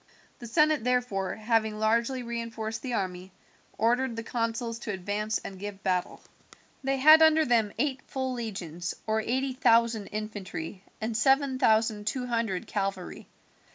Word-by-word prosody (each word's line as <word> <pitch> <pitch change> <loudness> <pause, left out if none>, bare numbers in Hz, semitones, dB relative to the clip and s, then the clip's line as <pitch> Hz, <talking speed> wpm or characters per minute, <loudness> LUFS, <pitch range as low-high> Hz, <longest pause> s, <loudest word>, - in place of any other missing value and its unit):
The 240 - -8
senate 305 +1 +3
therefore, 245 -6 0
having 220 -1 0
largely 235 +4 +1
reinforced 230 -2 -4
the 250 -3 -3
army, 185 -1 -4 0.5
ordered 240 +2 +1
the 230 - -4
consuls 230 0 -2
to 225 - -4
advance 205 +3 -2
and 190 -1 -9
give 200 -1 -7
battle. 180 -1 -1 0.6
They 270 0 0
had 310 +4 +8
under 315 0 +6
them 230 -4 +2
eight 270 -3 -1
full 260 -1 -2
legions, 180 -8 -5
or 220 0 +1
eighty 260 +4 -1
thousand 230 -4 +3
infantry 205 -4 -6 0.2
and 220 +1 -3
seven 270 +2 +3
thousand 220 -2 +2
two 250 +3 -1
hundred 230 -6 -1
cavalry. 195 -1 -4
225 Hz, 145 wpm, -28 LUFS, 205-250 Hz, 0.6 s, had